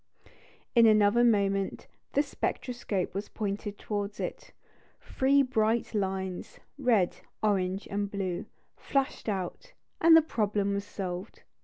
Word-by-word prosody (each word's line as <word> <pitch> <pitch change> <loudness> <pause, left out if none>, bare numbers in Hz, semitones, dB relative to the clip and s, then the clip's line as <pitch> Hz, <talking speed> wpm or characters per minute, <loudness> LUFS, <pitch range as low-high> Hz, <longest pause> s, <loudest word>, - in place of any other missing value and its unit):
In 235 -2 +7
another 215 +2 +5
moment 200 -4 +1 0.3
the 285 - +3
spectroscope 240 -8 -3
was 200 +2 -4
pointed 205 -1 -4
towards 205 -1 -4
it; - - -5 0.5
three 275 +1 +2
bright 235 -3 +1
lines 190 -3 -3 0.2
red, 225 -9 +2 0.3
orange, 195 -2 0
and 200 0 -2
blue 190 -3 -3 0.3
flashed 275 -4 -1
out, 200 - -4 0.3
and 325 0 +8
the 325 - +6
problem 205 -7 0
was 200 0 -2
solved. 185 -1 -6
205 Hz, 120 wpm, -29 LUFS, 195-235 Hz, 0.5 s, and